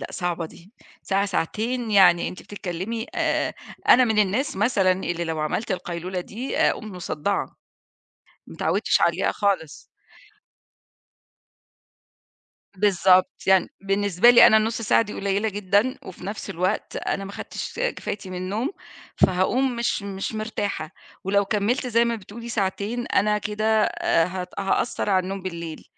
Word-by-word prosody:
لأ، - - -5
صعبة 175 -2 -2
دي، 175 +5 -17 0.3
ساعة 195 +1 +1
ساعتين 220 +6 -2
يعني 180 -4 +5
أنتِ - - -9
بتتكلّمي 205 +4 -5
آآ، - - 0 0.3
أنا 255 - +8
من 220 -3 +1
الناس 210 +4 +1
مثلًا 200 -3 +3
اللي 175 -2 -3
لو 160 -2 -3
عَمَلت 175 +9 -2
القيلولة 180 0 -4
دي 235 +8 -5
آآ، - - +4
أقوم 215 -1 -6
مصدَّعة، 180 +1 -3 0.9
ما - - -11
اتعوّدتش - - +1
عليها - - +2
خالص. 195 -7 -1 2.9
بالضبط، 185 -2 +4 0.2
يعني 190 -1 +4
بالنسبة 195 +2 +3
لي 245 - +9
أنا 220 - +6
النُصّ 225 +1 0
ساعة 220 - +3
دي 210 -2 -5
قليّلة 200 +2 -1
جدًا، 205 +5 +1
وفي 185 - -10
نَفْس 205 +2 -5
الوقت 185 +5 -2
أنا 195 - -2
ما 195 - -8
خدتش 465 - -6
آآ، - - +1
كفايتي 195 -2 -6
من 185 - -5
النوم، 205 - -2 0.4
فهاقوم 240 +8 +2
مش 235 -3 -1
مش 195 +1 -4
مرتاحة، 205 -7 -3 0.3
ولو 200 +1 +2
كمِّلت 220 +6 0
زي 235 0 +3
ما 235 0 0
بتقولي 225 +3 -9
ساعتين، 210 +3 -2
أنا 210 +1 +2
كده 210 +1 -3 0.2
آآ، 165 -4 +1
هت 180 0 -5
هأثّر 200 +2 0
على 185 -1 +3
النوم 195 +1 -5
بالليل، 170 -3 -6
200 Hz, 145 wpm, -24 LUFS, 185-220 Hz, 2.9 s, لي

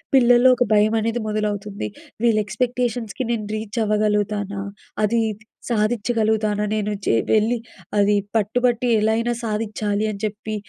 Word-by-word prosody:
పిల్లలో 245 0 +6
ఒక 245 - +4
భయమనేది 220 +2 +2
మొదలవుతుంది. 210 - -2 0.3
వీళ్ళు 225 -2 +4
ఎక్స్‌పెక్టేషన్స్‌కి 245 +2 -2
నేను 215 -3 -2
రీచ్ 215 +1 -4
అవ్వగలుగుతానా? 210 -1 0 0.4
అది, 230 +3 +2
ఇది 215 +2 -12 0.2
సాధిచ్చగలుగుతానా 215 -1 +1
నేను‌? 210 -1 -1
చే - - +2 0.2
వెళ్ళి 220 +3 +3 0.4
అది 205 +1 +4 0.2
పట్టుబట్టి 240 +3 +1
ఎలా 220 +1 +2
అయినా 235 +1 0
సాధిచ్చాలి 215 -1 -1
అని 200 - -7
చెప్పి 215 +1 -4
215 Hz, 125 wpm, -22 LUFS, 210-235 Hz, 0.4 s, పిల్లలో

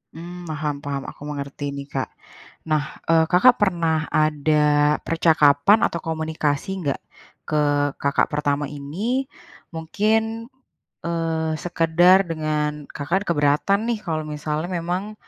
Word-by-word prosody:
Mmm, 175 +2 -8
paham- 150 -1 -2
paham, 140 -1 -3
aku - - -11
mengerti 145 -1 -5
ini, 140 0 -7
Kak. 135 -2 -4 0.6
Nah, 155 -1 +2 0.2
eee, 165 0 +5
Kakak 245 +8 +6
pernah 165 -5 +1
ada 150 -1 +2
percakapan 160 +3 +4
atau 170 - -5
komunikasi 160 0 -2
nggak 140 -2 -1 0.5
ke 150 -1 +1 0.3
kakak 140 0 +1
pertama 145 0 0
ini? 175 - -3 0.5
Mungkin, 220 +7 0 0.6
eee, 165 -1 -1
sekedar 175 +2 +4
dengan 150 -2 -2
Kakak 170 +7 -1
kan - - -10
keberatan 150 +6 +2
nih, 230 -2 0
kalau 155 -1 -2
misalnya 150 +2 -3
memang 185 +5 -3
155 Hz, 120 wpm, -22 LUFS, 145-175 Hz, 0.6 s, Kakak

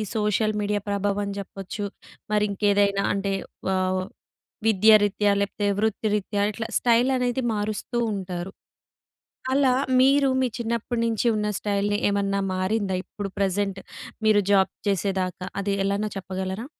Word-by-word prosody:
Social 215 0 +1
media 205 0 -1
ప్రభావం 200 0 -1
చెప్పొచ్చు, 195 +1 -6 0.5
మరి 210 0 +3
ఇంకేదైనా 200 0 +2
అంటే 200 0 -1 0.4
ఆహ్, 185 0 0 0.6
విద్య 220 0 +5
రీత్యా, 205 0 +2
లేపోతే 205 +1 -2
వృత్తిరీత్యా 210 -1 0
ఇట్లా 225 +2 -5
స్టైల్ 240 +1 +3
అనేది 250 +1 0
మారుస్తూ 210 +3 -3 0.2
ఉంటారు. 185 -1 -5 1.0
అలా 270 -2 +4 0.3
మీరు 275 +2 +5
మీ 260 - +2
చిన్నప్పటి 235 0 -2
నుంచి 230 +1 0
ఉన్న 210 0 -1
స్టైల్‌ని 205 0 0
ఏమన్నా 200 0 0 0.2
మారిందా? 190 +1 0
ఇప్పుడు 200 +1 -6
ప్రెజెంట్ 195 0 0 0.5
మీరు 215 -1 +5
జాబ్ 190 -1 +4 0.2
చేసేదాకా 190 -1 -1 0.2
అది 200 0 -1
ఎలానో 200 +2 0
చెప్పగలరా? 190 +3 -4
205 Hz, 120 wpm, -25 LUFS, 195-215 Hz, 1.0 s, విద్య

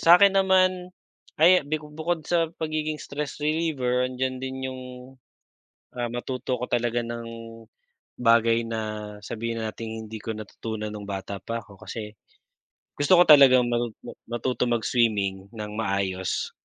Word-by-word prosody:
sakin 180 +4 +7
naman 185 -2 +3 0.5
ay 180 +4 +6
biko 150 0 -3
bukod 160 +1 -2
sa 165 0 +1
pagiging 155 -1 -2
stress 145 -1 -5
reliever 145 -5 0
andiyan 130 0 -3
din 130 0 -4
yung, 130 0 -6 1.1
ah 120 -1 -3
matuto 125 +2 -3
ko 125 - -6
talaga 120 0 +1
ng 115 0 -5 0.9
bagay 115 -1 +4
na 115 -1 -2 0.4
sabihin 115 +1 -4
na 110 - -2
nating 110 0 -6
hindi 110 0 -7
ko 110 +1 -5
natutunan 110 0 -6
nung 105 -1 -7
bata 100 0 -5
pa 115 +4 -5
ako 100 -2 -17
kasi 105 -2 -5 0.8
gusto 145 +6 +4
ko 175 - +8
talagang 135 -4 +8
matu 120 0 0 0.2
ma 120 - -7 0.2
matuto 125 -1 -1
mag-swimming 105 -5 0
ng 105 -2 -7
maayos. 95 -3 -1
120 Hz, 140 wpm, -26 LUFS, 110-150 Hz, 1.1 s, ko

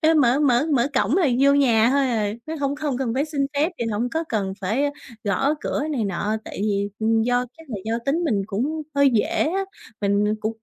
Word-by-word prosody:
ê, 320 +1 +4
mở 270 -2 +4
mở 270 -1 +3
mở 250 -2 +3
cổng 265 +3 +2
là 370 -4 +3
vô 280 +1 +6
nhà 240 -5 +4
thôi 280 +1 +3
à, 210 -3 0
nó 315 - -4
hông 280 0 0
hông 285 -5 -1
cần 245 -4 -1
phải 275 +3 +1
xin 285 -3 -1
phép 300 +4 +2
thì 235 - -1
hổng 225 +3 -1
có 320 +4 -1
cần 200 -4 -1
phải 210 +8 0 0.4
gõ 270 +9 +1
cửa - - -2
này 255 -7 -1
nọ. 205 +3 -1
Tại - - -8
vì, 200 -1 0
ừm, 225 0 +2
do 245 +1 +1
chắc 325 - -15
là 220 - -3
do 225 +1 -1
tính 330 +5 +1
mình 210 -10 +1
cũng 270 +10 -2
hơi 280 -1 +5
dễ 225 -4 +2 0.2
á, 390 +2 -1 0.4
mình 205 +1 +2
cũng 220 +1 -3
245 Hz, 230 wpm, -23 LUFS, 215-285 Hz, 0.4 s, vô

